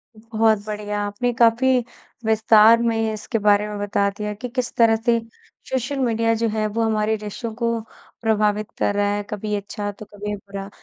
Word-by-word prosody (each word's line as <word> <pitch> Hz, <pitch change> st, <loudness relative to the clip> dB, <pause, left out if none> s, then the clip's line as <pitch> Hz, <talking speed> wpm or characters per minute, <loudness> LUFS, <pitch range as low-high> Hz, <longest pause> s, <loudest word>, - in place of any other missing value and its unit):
बहुत 220 Hz, 0 st, +1 dB
बढ़िया, 210 Hz, -1 st, -4 dB
आपने 245 Hz, +4 st, -1 dB
काफ़ी 240 Hz, +2 st, +4 dB, 0.5 s
विस्तार 220 Hz, +1 st, +6 dB
में 225 Hz, -1 st, 0 dB
इसके 220 Hz, +2 st, -3 dB
बारे 210 Hz, 0 st, +3 dB
में 210 Hz, -, -5 dB
बता 200 Hz, 0 st, +1 dB
दिया 210 Hz, 0 st, -3 dB
कि, 245 Hz, +4 st, -7 dB
किस 250 Hz, 0 st, -3 dB
तरह 225 Hz, -1 st, +5 dB
से 230 Hz, +1 st, +1 dB, 0.5 s
सोशल 265 Hz, +2 st, -2 dB
मीडिया 230 Hz, -2 st, +1 dB
जो 230 Hz, +1 st, 0 dB
है, 215 Hz, 0 st, -1 dB
वो 225 Hz, +2 st, -1 dB
हमारे 220 Hz, 0 st, +1 dB
रिश्तों 215 Hz, +2 st, -6 dB
को 230 Hz, -1 st, -1 dB, 0.4 s
प्रभावित 215 Hz, -1 st, +1 dB
कर 205 Hz, -, +1 dB
रहा 205 Hz, 0 st, +2 dB
है। 205 Hz, -, -3 dB
कभी 210 Hz, 0 st, -3 dB
अच्छा, 205 Hz, +1 st, -4 dB
तो 210 Hz, +1 st, -11 dB
कभी 205 Hz, 0 st, -5 dB
बुरा। 195 Hz, 0 st, -8 dB
220 Hz, 175 wpm, -22 LUFS, 210-230 Hz, 0.5 s, विस्तार